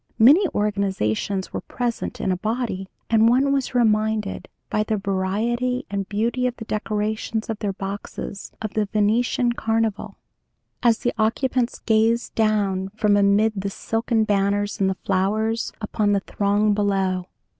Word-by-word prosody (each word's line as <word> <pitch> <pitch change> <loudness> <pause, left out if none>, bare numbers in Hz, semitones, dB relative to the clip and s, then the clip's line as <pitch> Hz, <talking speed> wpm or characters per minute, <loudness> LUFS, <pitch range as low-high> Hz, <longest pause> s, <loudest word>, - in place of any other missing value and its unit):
Many 295 - +7
organizations 195 - -1
were - - -3
present 240 -2 -3
in 190 - 0
a - - +1
body, 215 -2 -2 0.2
and 225 0 +5
one 270 +3 +3
was 270 -2 -1
reminded, 215 -3 +1 0.2
by 215 - 0
the 215 0 0
variety 215 +6 -1
and 200 -1 -3
beauty 235 +4 0
of 245 - -3
the 225 - -8
decorations 215 +1 -2
of 220 - -5
their 200 -2 -2
boxes, 195 +1 -6
of 215 - -4
the 215 -1 +1
Venetian 225 +4 +1
Carnival, 225 -2 -1 0.6
as 235 -2 +4
the 240 - -1
occupants 245 +2 +1
gazed 225 +1 +1
down 205 -4 +1
from 210 -2 +3
amid 205 +2 +3
the 200 0 -2
silken 225 +2 0
banners 205 0 0
and 190 - +3
the 190 - -2
flowers, 215 +4 0
upon 210 -1 0
the 200 - +1
throng 205 +2 +1
below. 195 -3 0
215 Hz, 145 wpm, -23 LUFS, 200-230 Hz, 0.6 s, Many